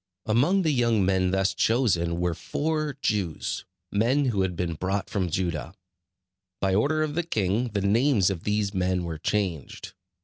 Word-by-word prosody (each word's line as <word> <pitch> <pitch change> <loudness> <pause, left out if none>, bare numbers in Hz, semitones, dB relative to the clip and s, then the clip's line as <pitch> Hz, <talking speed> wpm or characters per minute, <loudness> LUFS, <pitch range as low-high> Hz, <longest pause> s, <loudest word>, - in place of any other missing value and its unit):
Among 140 - +3
the 160 - +2
young 115 -6 +2
men 95 -1 +2
thus 95 +1 +1
chosen 90 -9 +1
were 90 -1 0
four 155 - -2
Jews, 95 -7 -1 0.3
men 125 +8 +2
who 110 -7 +1
had 95 -2 -1
been 85 0 -2
brought 95 +5 -2
from 95 -4 0
Judah. 85 -1 -2 0.8
By 95 -1 +1
order 150 +10 +2
of 150 -1 -2
the 175 - +1
king 110 - 0
the 105 -3 -2
names 105 0 +3
of 85 -3 -5
these 105 -1 0
men 90 -1 0
were 80 -2 -5
changed. 90 -6 -3
100 Hz, 165 wpm, -26 LUFS, 90-120 Hz, 0.8 s, Among